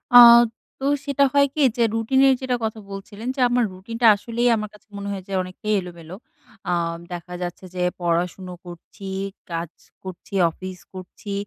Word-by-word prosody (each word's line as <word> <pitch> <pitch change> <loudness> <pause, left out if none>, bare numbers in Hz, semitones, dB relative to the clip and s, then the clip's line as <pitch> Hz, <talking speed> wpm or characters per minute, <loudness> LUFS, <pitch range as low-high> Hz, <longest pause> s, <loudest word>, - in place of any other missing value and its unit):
আ - - +13 0.6
তো 270 - -4 0.2
সেটা 280 0 +2
হয় 280 0 +5
কি 305 - 0 0.2
যে 235 - +3
রুটিন 225 +4 +1
এর 265 - +6
যেটা 255 -1 0
কথা 220 0 -2
বলছিলেন, 205 +4 -8
যে - - -7
আমার 245 0 +2
রুটিন 200 +5 -8
টা 230 - +7
আসলেই 235 +3 0
আমার 215 -1 -4
কাছে 210 - -19
মনে 200 0 -5
হয় 190 -2 -5
যে 195 - -6
অনেকেই 185 +4 -3
এলোমেলো। 170 0 -10 0.6
আ - - +2 0.4
দেখা 175 +1 -7
যাচ্ছে 180 +1 -5
যে 180 - -1 0.2
পড়াশোনা 175 +2 -1
করছি, 175 +3 -10 0.4
কাজ 165 0 -3 0.3
করছি, 185 +1 -10 0.2
অফিস 185 +1 -8
করছি। 185 +2 -8
195 Hz, 175 wpm, -23 LUFS, 180-230 Hz, 0.6 s, আ